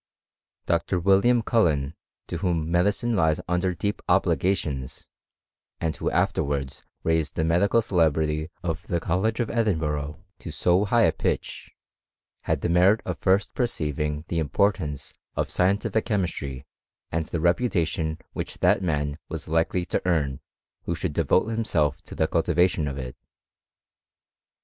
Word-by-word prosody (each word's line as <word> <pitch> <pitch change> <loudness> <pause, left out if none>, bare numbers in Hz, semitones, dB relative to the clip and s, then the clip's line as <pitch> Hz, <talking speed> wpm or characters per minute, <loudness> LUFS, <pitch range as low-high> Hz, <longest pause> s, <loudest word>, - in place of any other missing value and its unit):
Dr. 85 +2 +1
William 100 +7 +4
Cullen, 80 - +2 0.3
to 85 - -4
whom 85 -2 -1
medicine 105 +6 +1
lies 80 -5 +2
under 90 +1 0
ep 100 -1 -1
obligations, 75 -9 0 0.7
and 80 -2 -1
who, - - -1
afterwards 70 -2 -1 0.2
raised 80 -2 0
the - - 0
Bdical 95 +8 +3
celebrity 80 -3 +1
of 80 -3 -3
the 85 - 0
College 95 +8 0
of 120 - -1
Edinburgh 80 -8 -1
to - - -8
so 90 +5 +2
^h 115 +2 +4
a - - +3
pitch, - - -3 0.8
had - - 0
the - - 0
merit 90 +5 +4
of 90 -4 -4
first 95 +1 +2
perceiving 75 - -2
the 85 -1 -1
portance 75 -5 0 0.2
of - - -1
scientific 100 +4 +1
chemistry, 80 - -2 0.5
and 80 -1 -1
the - - -3
reputa* 85 0 +1
n 80 -1 -1 0.2
which - - -5
that - - +3
man 75 -4 -1
was 80 -2 -6
likely 80 +3 +1
to - - -1
earn, 75 -6 +1 0.5
who 85 - -1
shouM 85 -1 -3
vote 95 - +4
himself 80 -11 0
to - - -11
the 80 - +2
cultivation 85 -1 +2
of 70 0 -4
it. 65 -2 -6
85 Hz, 140 wpm, -25 LUFS, 75-95 Hz, 0.8 s, William